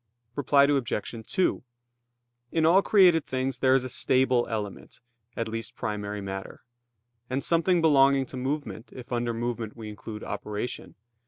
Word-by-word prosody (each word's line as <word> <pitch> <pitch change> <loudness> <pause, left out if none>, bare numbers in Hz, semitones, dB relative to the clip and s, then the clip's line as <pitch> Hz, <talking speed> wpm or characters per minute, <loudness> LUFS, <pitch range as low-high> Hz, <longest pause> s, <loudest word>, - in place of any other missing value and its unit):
Reply 140 0 +4
Obj. 135 -7 0
2: 185 - 0 0.9
In 160 -1 +2
all 180 +4 +6
created 180 -7 +4
things 130 -1 -2
there 130 0 +4
is 135 - +2
a - - -3
stable 130 -1 +2
element, 105 -3 -5 0.4
at 115 - -1
least 115 -1 -5
primary 105 -1 -4
matter; 95 0 -7 0.7
and 130 +2 -2
something 170 +1 +2
belonging 140 -3 +4
to 130 - -10
movement, 130 -2 -4
if 125 -1 -11
under 120 0 0
movement 115 -1 -4
we 110 -2 -7
include 105 +1 -8
operation. 105 +3 -5
125 Hz, 145 wpm, -27 LUFS, 110-140 Hz, 0.9 s, all